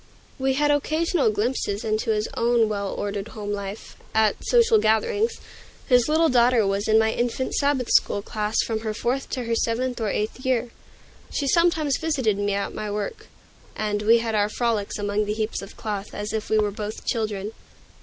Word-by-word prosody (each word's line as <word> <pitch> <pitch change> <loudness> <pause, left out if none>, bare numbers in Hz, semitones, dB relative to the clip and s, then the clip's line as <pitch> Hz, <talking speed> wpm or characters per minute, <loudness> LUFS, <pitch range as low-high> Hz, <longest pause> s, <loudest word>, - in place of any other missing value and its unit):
We 265 0 +1
had 295 +2 +2
occasional 310 -1 +1
glimpses 215 -1 -1
into 215 0 -1
his 215 0 +1
own 235 -1 +3
well 200 -2 -2
ordered 200 0 -3
home 210 -2 -6
life, 200 0 -6 0.2
at 220 -1 +4
social 465 -2 +4
gatherings. 420 - +2 0.5
His 250 +1 +4
little 320 +2 +4
daughter 245 -4 +4
was 195 +1 -1
in 220 0 +5
my 220 0 +3
infant 245 +2 -2
Sabbath 280 -4 +1
school 200 - +3
class 215 0 -1
from 225 -1 -2
her 220 -1 -4
fourth 255 +5 -2
to 255 - -3
her 230 0 -2
seventh 240 +2 -1
or 215 - 0
eighth 215 +6 -3
year. 245 -3 0 0.6
She 285 - -2
sometimes 315 -3 +2
visited 260 -11 0
me 205 0 0
at 200 - -2
my 215 -1 -4
work, 210 - -4 0.5
and 210 -1 -1
we 225 +2 +5
had 230 -1 -2
our 210 -1 +2
frolics 225 -3 -1
among 205 0 -1
the 210 - -1
heaps 220 0 -2
of 195 - -11
cloth, 205 -2 -5
as 210 +1 -4
if 220 -1 -3
we 220 - +3
were 210 -1 +2
both 210 +1 -6
children. 215 -3 -2
220 Hz, 185 wpm, -24 LUFS, 210-255 Hz, 0.6 s, in